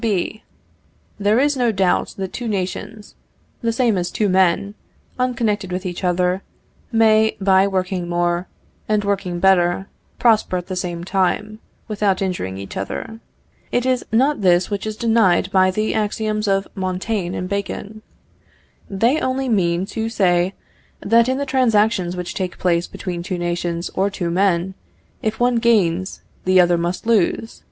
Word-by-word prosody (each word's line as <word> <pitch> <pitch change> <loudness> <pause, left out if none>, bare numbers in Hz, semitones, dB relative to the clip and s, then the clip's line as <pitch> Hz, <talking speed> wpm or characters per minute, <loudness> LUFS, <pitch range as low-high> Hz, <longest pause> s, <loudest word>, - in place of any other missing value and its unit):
B. 215 -1 -1 0.8
There 210 +3 +3
is 290 +1 +2
no 245 -3 +2
doubt 190 -3 0
that 190 -1 -4
two 240 - -4
nations, 210 +2 -4 0.5
the 230 - +1
same 225 -4 +1
as 175 - -2
two 210 -2 0
men, 190 +2 +2 0.5
unconnected 225 -6 0
with 180 +1 -3
each 180 +1 -5
other, 180 +1 +1 0.5
may, 220 -1 +4
by 190 0 +4
working 185 -2 -2
more, 175 +1 0 0.4
and 210 -1 +2
working 195 -3 -2
better, 185 0 +3 0.3
prosper 220 -5 +3
at 180 - -5
the 185 - -5
same 175 -2 -3
time, 195 +3 -1 0.3
without 205 -3 0
injuring 175 - -3
each 100 0 -7
other. 225 - -5 0.5
It 245 - 0
is 255 -1 +1
not 265 +4 +2
this 180 +1 +3
which 205 +1 -2
is 215 0 -4
denied 220 -6 +2
by 185 -1 +4
the 215 +3 -1
axioms 215 0 -1
of 195 0 +1
Montaigne 185 0 -2
and 180 - -3
Bacon. 200 +2 -4 0.9
They 230 +10 +2
only 260 0 -1
mean 180 -4 +1
to 225 0 -2
say, 180 -3 +1 0.4
that 230 +3 +3
in 260 - 0
the 280 - -2
transactions 220 -8 +2
which 180 -1 -5
take 185 -2 -4
place 170 -1 +1
between 175 -2 -5
two 180 +1 -4
nations 175 0 -2
or 195 +2 +1
two 175 -3 -3
men, 185 0 +1 0.5
if 220 0 -2
one 245 0 +3
gains, 190 -6 +1 0.2
the 185 0 +4
other 175 -1 +4
must 180 +6 -4
lose. 225 0 +1
195 Hz, 155 wpm, -20 LUFS, 180-220 Hz, 0.9 s, may